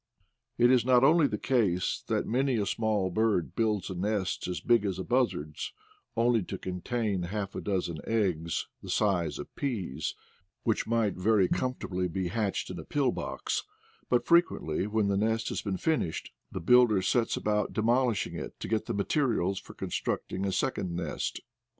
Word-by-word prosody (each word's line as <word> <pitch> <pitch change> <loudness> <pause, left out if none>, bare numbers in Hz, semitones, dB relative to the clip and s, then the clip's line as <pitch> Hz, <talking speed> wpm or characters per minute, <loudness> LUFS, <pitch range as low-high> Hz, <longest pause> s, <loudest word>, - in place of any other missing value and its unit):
It 120 +1 +5
is 125 -2 +5
not 125 0 +5
only 155 +1 +6
the 105 - -2
case 100 -8 +1
that - - 0
many 130 +2 +1
a 105 - +1
small 105 -4 0
bird 105 -4 +1
builds 110 -4 +1
a - - -2
nest 95 +1 -1
as 90 -1 -2
big 120 -3 +3
as 95 -3 -1
a 95 - -3
buzzard's, 115 - -1 0.4
only 115 -1 +3
to 95 +1 -5
contain 95 +2 -2
half 95 +2 -3
a - - -4
dozen 90 -5 -2
eggs 90 -7 0
the - - -9
size 95 -6 +1
of - - -9
peas, 90 - -3 0.5
which 110 - 0
might 115 -3 +2
very 100 0 +3
comfortably 95 -8 -1
be 90 +1 -2
hatched 105 -3 -1
in 90 - -6
a - - -6
pill 135 - +1
box; - - -3 0.5
but 125 - +2
frequently, 170 - +2
when 105 -1 +1
the 100 -1 +1
nest 110 +2 +1
has - - -2
been 100 -3 -2
finished, 155 - -1 0.2
the - - -4
builder 110 +1 +5
sets 115 +4 +1
about 105 -1 0
de 110 - -1
molishing 120 -1 +2
it - - -7
to - - -5
get 110 -1 -1
the - - -2
materials 100 - +1
for - - -13
constructing 95 +1 -2
a - - 0
second 95 -4 -1
nest. 85 -4 -3
105 Hz, 175 wpm, -29 LUFS, 95-120 Hz, 0.5 s, only